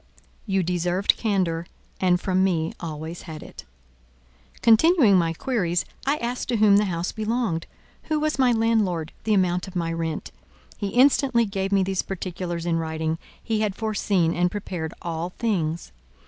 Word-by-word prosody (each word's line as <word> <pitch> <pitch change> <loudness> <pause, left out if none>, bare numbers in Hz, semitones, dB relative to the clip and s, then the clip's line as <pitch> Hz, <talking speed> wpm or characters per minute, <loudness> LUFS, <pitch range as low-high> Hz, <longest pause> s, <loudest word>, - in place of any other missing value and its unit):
You 195 -2 +1
deserved 180 +2 +1
candour, 180 -6 0 0.3
and 180 -1 +3
from 185 0 +1
me 165 -4 0
always 160 +1 -6
had 155 -1 -7
it. - - -11 1.0
Continuing 240 - +6
my 170 -2 +3
queries, 175 -3 -1 0.2
I 285 +2 +3
asked 245 0 -3
to 245 - +1
whom 210 -2 +5
the 210 - +3
house 175 -2 -2
belonged, 220 -6 -1 0.4
who 310 -1 0
was 305 -2 -1
my 255 -2 +5
landlord, 215 -8 +1
the 215 -1 +3
amount 180 -1 +1
of 190 - -11
my 165 -1 -1
rent. 165 -1 -3 0.5
He 205 - -1
instantly 255 +1 +4
gave 195 -1 -3
me 195 -1 +4
these 190 0 0
particulars 175 -2 -4
in 170 -1 +1
writing; 160 0 -2 0.2
he 220 -2 0
had 210 -3 0
foreseen 200 -6 +1
and 180 +1 +2
prepared 175 -5 -4
all 170 +1 -3
things. 170 -8 -1
185 Hz, 160 wpm, -24 LUFS, 170-220 Hz, 1.0 s, Continuing